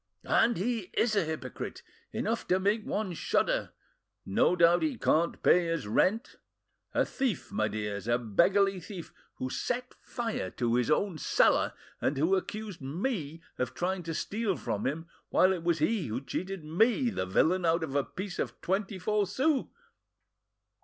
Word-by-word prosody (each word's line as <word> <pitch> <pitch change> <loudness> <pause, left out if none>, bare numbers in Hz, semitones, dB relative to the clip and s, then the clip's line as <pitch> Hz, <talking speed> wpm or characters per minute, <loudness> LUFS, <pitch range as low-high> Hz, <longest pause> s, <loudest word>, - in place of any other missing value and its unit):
"And 230 0 +3
he 215 0 -2
is 220 -2 +2
a 200 -5 +2
hypocrite! 155 -5 -5 0.3
enough - - -2
to 185 - +3
make 205 +3 +1
one 205 -4 -2
shudder! - - 0 0.6
No - - +3
doubt 175 0 +5
he 300 -6 0
can't 170 -4 +1
pay 175 -1 +5
his 165 -6 -1
rent! 195 - +1 0.6
A - - +3
thief, 260 -8 -2
my 110 - +1
dears, 105 -1 -4
a 120 0 +3
beggarly 185 - +3
thief, 175 -1 -9 0.2
who 130 0 -4
set 250 - -2
fire 225 - -3
to 120 -1 +1
his 125 +1 +2
own 165 +2 +1
cellar, - - +3 0.3
and 140 - 0
who 165 +7 +3
accused 205 -1 -4
me 165 - -3 0.2
of 125 - -2
trying 185 +1 -1
to 165 -1 -4
steal 210 +1 -1
from 105 - -2
him, 160 +5 -3 0.2
while 185 +1 +4
it 180 - -4
was 170 -1 +1
he 185 - +1
who 110 +3 -2
cheated 185 +6 -5
me, 225 - +2
the 95 - -2
villain, 175 - +2
out 165 0 +2
of 145 -4 -4
a 140 -1 +2
piece 190 +4 -6
of - - -3
twenty 195 +2 -1
four 205 +2 +1
sous. 265 - +1
180 Hz, 165 wpm, -30 LUFS, 155-210 Hz, 0.6 s, doubt